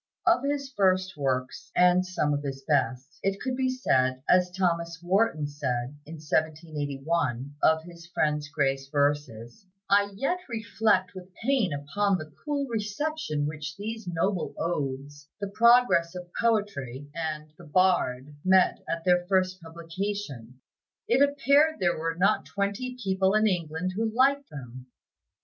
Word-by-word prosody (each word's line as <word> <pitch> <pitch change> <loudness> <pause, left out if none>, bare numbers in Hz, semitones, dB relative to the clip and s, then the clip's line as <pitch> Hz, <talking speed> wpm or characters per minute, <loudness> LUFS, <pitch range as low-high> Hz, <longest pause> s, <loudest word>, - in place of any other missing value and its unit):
Of 340 -7 +4
his 280 -1 -2
first 185 -3 +2
works 130 -3 -2
(and 180 0 +5
some 180 -5 -1
of 145 - -1
his 135 -1 -5
best) 140 +3 0
it 195 0 -1
could 260 -1 -2
be 260 0 0
said, 130 - +1
as 180 0 +4
Thomas 170 -2 -1
Wharton 185 -4 +2
said, 130 -2 -3
in 165 - -7
1781, 150 -3 -2
of 160 0 +4
his 170 0 -12
friend 150 -3 0
Gray's 135 -2 0
verses, 145 - -1 0.2
"I 200 0 +5
yet 275 - -1
reflect 220 -4 +1
with 185 -1 -10
pain 240 - +1
upon 185 +8 0
the 155 -3 -9
cool 290 -2 -1
reception 215 - -2
which 150 -1 -5
those 220 0 -6
noble 175 +1 -1
odes, 145 -2 -4
'The 200 -1 -3
Progress 235 -6 +4
of 180 -1 -8
Poetry' 145 - -1
and 155 -2 -4
'The 175 - -14
Bard' 150 -5 +1
met 185 0 +4
with - - -17
at 165 - -2
their 180 -1 +3
first 185 -1 +1
publication; 165 - -6 0.5
it 250 +3 +3
appeared 285 +2 +4
there 175 -3 +1
were 165 0 -2
not 180 +3 +2
twenty 205 +6 -3
people 190 +1 +2
in 215 0 +4
England 180 -2 -1
who 220 +1 0
liked 275 +4 +2
them." 130 -3 -9
175 Hz, 145 wpm, -27 LUFS, 145-205 Hz, 0.5 s, and